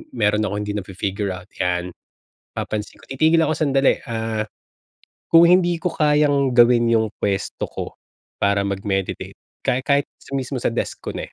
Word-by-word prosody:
meron 105 Hz, +1 st, +2 dB
akong 100 Hz, +1 st, -3 dB
hindi 105 Hz, -, -3 dB
na-fi-figure 100 Hz, 0 st, -3 dB
out 90 Hz, -, -11 dB, 0.2 s
'yan. 90 Hz, 0 st, -1 dB, 0.6 s
Papansin 105 Hz, -1 st, -4 dB
ko, -, -, -13 dB
titigil 155 Hz, +5 st, +2 dB
ako 155 Hz, -, +1 dB
sandali, 140 Hz, -3 st, +2 dB
ah, 110 Hz, -1 st, -2 dB, 0.9 s
kung 165 Hz, 0 st, +6 dB
hindi 175 Hz, -1 st, +4 dB
ko 180 Hz, -, -1 dB
kayang 150 Hz, -4 st, +2 dB
gawin 120 Hz, 0 st, +5 dB
yung 110 Hz, -2 st, +2 dB
puwesto 100 Hz, -1 st, -2 dB
ko -, -, -7 dB, 0.4 s
para 100 Hz, 0 st, +2 dB
mag-meditate, 95 Hz, -1 st, -3 dB, 0.3 s
kahit 125 Hz, +1 st, +1 dB
kahit 140 Hz, +1 st, +2 dB, 0.3 s
mismo 135 Hz, +1 st, -3 dB
sa -, -, +1 dB
desk 115 Hz, -, -4 dB
ko -, -, -4 dB
na -, -, -4 dB
eh. -, -, -22 dB
115 Hz, 160 wpm, -21 LUFS, 100-140 Hz, 0.9 s, kung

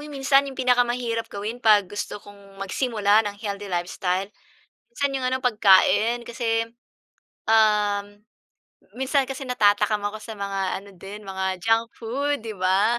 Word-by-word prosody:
minsan, 275 Hz, -1 st, +3 dB
yung 270 Hz, -, -9 dB
pinakamahirap 245 Hz, -2 st, +1 dB
gawin 215 Hz, +4 st, -5 dB
'pag 210 Hz, -4 st, +5 dB
gusto 205 Hz, +3 st, -5 dB
kong 200 Hz, -1 st, -15 dB
magsimula 210 Hz, +1 st, +1 dB
ng 205 Hz, -, -9 dB
healthy 205 Hz, -1 st, -5 dB
lifestyle? 180 Hz, +2 st, -2 dB, 0.6 s
Minsan 280 Hz, -, -1 dB
yung 265 Hz, -, -2 dB
ano, 260 Hz, -, 0 dB
pagkain. 230 Hz, 0 st, +4 dB
Kasi, 230 Hz, -1 st, -1 dB, 0.8 s
um, 210 Hz, -2 st, +3 dB, 0.9 s
minsan 265 Hz, +1 st, +1 dB
kasi 270 Hz, +1 st, -5 dB
natatakam 210 Hz, -3 st, +2 dB
ako 215 Hz, +1 st, -5 dB
sa 225 Hz, -, -8 dB
mga 200 Hz, -1 st, -3 dB, 0.2 s
ano 200 Hz, -, -14 dB
din, 200 Hz, +4 st, -9 dB
mga 190 Hz, -1 st, -3 dB
junk 225 Hz, 0 st, +2 dB
food, 275 Hz, +4 st, -2 dB
'di 220 Hz, -1 st, -6 dB
ba? 195 Hz, +6 st, +2 dB
215 Hz, 140 wpm, -24 LUFS, 200-245 Hz, 0.9 s, pag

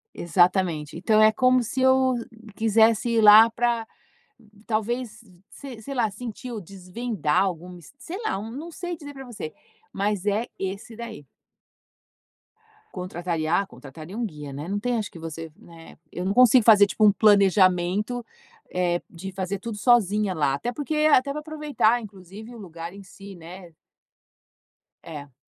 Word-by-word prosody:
Exatamente. 175 Hz, -3 st, +1 dB
Então 215 Hz, +4 st, +3 dB
é 215 Hz, 0 st, +7 dB
como 255 Hz, +2 st, +3 dB
se 255 Hz, +3 st, -3 dB
eu 260 Hz, -1 st, +4 dB, 0.4 s
quisesse 225 Hz, +1 st, +3 dB
ir 225 Hz, -, +4 dB
lá 215 Hz, +2 st, +9 dB
pra, 235 Hz, -1 st, -1 dB, 0.8 s
talvez, 220 Hz, 0 st, -2 dB, 0.3 s
se 255 Hz, -6 st, -10 dB
sei 275 Hz, +3 st, -6 dB
lá, 235 Hz, -4 st, +1 dB
sentir 240 Hz, +3 st, -8 dB
ou 215 Hz, -, -5 dB
desvendar 190 Hz, -1 st, -2 dB
algum 180 Hz, -1 st, -4 dB
mist 175 Hz, -, -14 dB
sei 360 Hz, +4 st, -7 dB
lá, 195 Hz, -, -1 dB
não 265 Hz, +10 st, -7 dB
sei 350 Hz, +1 st, -5 dB
dizer 290 Hz, -2 st, -10 dB
pra 270 Hz, -1 st, -9 dB
você, 205 Hz, -10 st, -7 dB, 0.4 s
mas 200 Hz, -1 st, -2 dB
é 210 Hz, +3 st, 0 dB
esse 195 Hz, +4 st, -5 dB
daí. 230 Hz, -, -9 dB, 1.7 s
Contrataria, 175 Hz, -2 st, -2 dB
ah, -, -, -5 dB
contrataria 155 Hz, +8 st, -11 dB
um 240 Hz, -, -3 dB
guia, 150 Hz, -8 st, -7 dB
né, 145 Hz, +4 st, -6 dB
não 200 Hz, +1 st, -2 dB
tem 245 Hz, 0 st, -1 dB
acho 210 Hz, -, -4 dB
que -, -, -13 dB
você, 165 Hz, 0 st, -7 dB
né, 165 Hz, -1 st, -15 dB
eu 180 Hz, -, -5 dB
não 190 Hz, -, -1 dB
consigo 250 Hz, -1 st, +6 dB
fazer, 210 Hz, -3 st, +7 dB
tipo, 215 Hz, -, -2 dB
um 210 Hz, -, +7 dB
planejamento, 200 Hz, +2 st, +3 dB, 0.5 s
eh, 175 Hz, -1 st, 0 dB
de 190 Hz, +3 st, -8 dB
fazer 190 Hz, +1 st, -3 dB
tudo 220 Hz, -1 st, -6 dB
sozinha 210 Hz, -5 st, +2 dB
lá, 145 Hz, -3 st, +1 dB
até 235 Hz, -, -3 dB
porque, 295 Hz, +4 st, -4 dB, 0.2 s
até 280 Hz, +1 st, +4 dB
pra 300 Hz, -, -4 dB
aproveitar 300 Hz, -7 st, 0 dB
inclusive 200 Hz, +3 st, -11 dB
o -, -, -11 dB
lugar 170 Hz, -2 st, -8 dB
em 200 Hz, -, -11 dB
si, 195 Hz, 0 st, -12 dB
né. 175 Hz, 0 st, -12 dB, 1.3 s
É. 145 Hz, -4 st, -9 dB
205 Hz, 160 wpm, -24 LUFS, 180-240 Hz, 1.7 s, lá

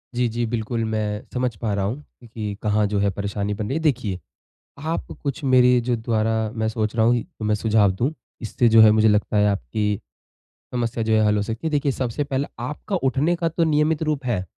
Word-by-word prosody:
जी 125 Hz, 0 st, +2 dB
जी, 120 Hz, +1 st, -2 dB
बिल्कुल। 115 Hz, 0 st, -2 dB
मैं 110 Hz, -1 st, -2 dB
समझ 125 Hz, -3 st, -1 dB
पा 105 Hz, 0 st, -2 dB
रहा 100 Hz, -1 st, 0 dB
हूँ 125 Hz, +9 st, -4 dB, 0.2 s
कि 110 Hz, -3 st, -5 dB
कहाँ 105 Hz, 0 st, +2 dB
जो 100 Hz, -1 st, -1 dB
है 100 Hz, -, +2 dB
परेशानी 100 Hz, +1 st, -3 dB
बन 105 Hz, 0 st, -4 dB
रही 135 Hz, -, -1 dB
है। -, -, -1 dB
देखिए, 120 Hz, -, 0 dB, 0.6 s
आप 160 Hz, +3 st, -3 dB, 0.2 s
कुछ 140 Hz, 0 st, -3 dB
मेरे 125 Hz, -1 st, +5 dB
जो 120 Hz, +1 st, 0 dB
द्वारा 115 Hz, -1 st, 0 dB, 0.2 s
मैं 110 Hz, -2 st, -1 dB
सोच 110 Hz, -1 st, -2 dB
रहा 110 Hz, -1 st, +3 dB
हूँ 120 Hz, 0 st, +3 dB
तो 110 Hz, -, -9 dB
मैं 105 Hz, 0 st, +2 dB
सुझाव 105 Hz, -2 st, +3 dB
दूँ। 125 Hz, +11 st, -1 dB, 0.3 s
इससे 120 Hz, +2 st, +1 dB
जो 115 Hz, 0 st, +7 dB
है 110 Hz, -1 st, +8 dB
मुझे 110 Hz, 0 st, +4 dB
लगता 105 Hz, 0 st, +2 dB
है 105 Hz, 0 st, +4 dB
आपकी 105 Hz, 0 st, -1 dB, 0.7 s
समस्या 120 Hz, -2 st, -1 dB
जो 110 Hz, -, +1 dB
है 110 Hz, 0 st, +4 dB
हल 105 Hz, 0 st, +3 dB
हो 105 Hz, -, +1 dB
सकती 115 Hz, +9 st, -3 dB
है। -, -, -2 dB
देखिए 145 Hz, -1 st, +1 dB
सबसे 130 Hz, +2 st, -2 dB
पहले 140 Hz, 0 st, -2 dB
आपका 150 Hz, -, -4 dB
उठने 145 Hz, +6 st, +1 dB
का 170 Hz, -1 st, -1 dB
तो 165 Hz, +1 st, 0 dB
नियमित 155 Hz, 0 st, +2 dB
रूप 150 Hz, -3 st, -2 dB
है, 105 Hz, -7 st, -1 dB
115 Hz, 220 wpm, -23 LUFS, 105-130 Hz, 0.7 s, है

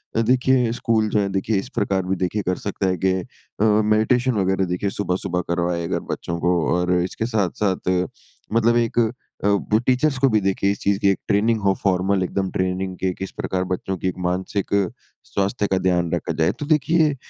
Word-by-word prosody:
अ, 115 Hz, -, +3 dB
देखिए 125 Hz, 0 st, +3 dB
स्कूल 110 Hz, -3 st, +1 dB
जो 105 Hz, -, +1 dB
है 100 Hz, -1 st, 0 dB
देखिए 95 Hz, +2 st, 0 dB
इस 125 Hz, -, -7 dB
प्रकार 95 Hz, -2 st, 0 dB
भी 95 Hz, +1 st, 0 dB
देखिए 95 Hz, +4 st, -1 dB
कर 90 Hz, 0 st, -1 dB
सकता 100 Hz, -1 st, -2 dB
है 90 Hz, -1 st, 0 dB
कि 95 Hz, -, +4 dB
अ, 95 Hz, +3 st, -6 dB
मेडिटेशन 110 Hz, +4 st, +3 dB
वगैरह 95 Hz, 0 st, +1 dB
देखिए 90 Hz, +3 st, -1 dB
सुबह-सुबह 90 Hz, -2 st, -2 dB
करवाए 85 Hz, 0 st, 0 dB
अगर -, -, -1 dB
बच्चों 85 Hz, 0 st, -4 dB
को। 90 Hz, +1 st, +2 dB, 0.2 s
और 90 Hz, 0 st, 0 dB
अ, 90 Hz, -, +3 dB
इसके 95 Hz, +4 st, -3 dB
साथ-साथ 100 Hz, -4 st, -1 dB
अ, 90 Hz, 0 st, +2 dB, 0.5 s
मतलब 115 Hz, +1 st, +3 dB
एक 120 Hz, 0 st, +1 dB, 0.4 s
अ, -, -, +2 dB
वो 100 Hz, +1 st, +2 dB
टीचर्स 130 Hz, +3 st, +1 dB
को 135 Hz, -, +4 dB
भी 110 Hz, -, +3 dB
देखिए 100 Hz, +1 st, +1 dB
इस 100 Hz, -, -4 dB
चीज़ 100 Hz, -1 st, +1 dB
की 100 Hz, -, +3 dB
एक 95 Hz, -, +1 dB
ट्रेनिंग 110 Hz, +2 st, +2 dB
हो 100 Hz, -1 st, +3 dB
फॉर्मल 95 Hz, 0 st, +2 dB
एकदम 95 Hz, +1 st, -2 dB
ट्रेनिंग 95 Hz, 0 st, -2 dB
के 95 Hz, -1 st, -1 dB
किस 95 Hz, +2 st, -6 dB
प्रकार 95 Hz, 0 st, -2 dB
बच्चों 95 Hz, +1 st, -3 dB
की 95 Hz, -, -2 dB
एक 90 Hz, -, -2 dB
मानसिक 95 Hz, +3 st, -2 dB
अ, 100 Hz, -2 st, +3 dB, 0.4 s
स्वास्थ्य 100 Hz, +1 st, -1 dB
का 95 Hz, -, +1 dB
ध्यान 90 Hz, -2 st, +1 dB
रखा -, -, -1 dB
जाए। 80 Hz, -, +3 dB
तो 145 Hz, -, -3 dB
देखिए 155 Hz, 0 st, +2 dB
100 Hz, 210 wpm, -22 LUFS, 90-110 Hz, 0.5 s, कि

